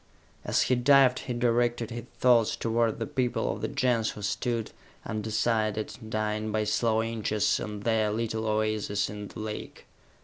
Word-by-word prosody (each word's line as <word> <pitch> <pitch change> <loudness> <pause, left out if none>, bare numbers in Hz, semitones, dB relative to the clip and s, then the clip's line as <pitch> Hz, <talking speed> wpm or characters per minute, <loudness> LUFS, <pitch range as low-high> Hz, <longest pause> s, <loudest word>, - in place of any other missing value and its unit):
As - - +2
he - - +1
dived 130 0 +5
he 125 - -4
directed 120 -1 +1
his 120 0 -6
thoughts 120 -3 +4
toward 115 0 0
the - - -2
people 125 -5 -1
of - - -8
the - - -1
Gens 125 -5 +1
who 105 - -7
stood, 115 +1 -2 0.3
undecided, 110 0 -1
dying 110 0 -1
by 110 0 +1
slow 110 +1 +1
inches, 110 -2 0
on 105 -1 -5
their 110 -1 +1
little 110 0 -2
oases 110 -1 0
in 105 -1 -6
the - - -10
lake. 110 0 -6
110 Hz, 160 wpm, -28 LUFS, 110-120 Hz, 0.3 s, dived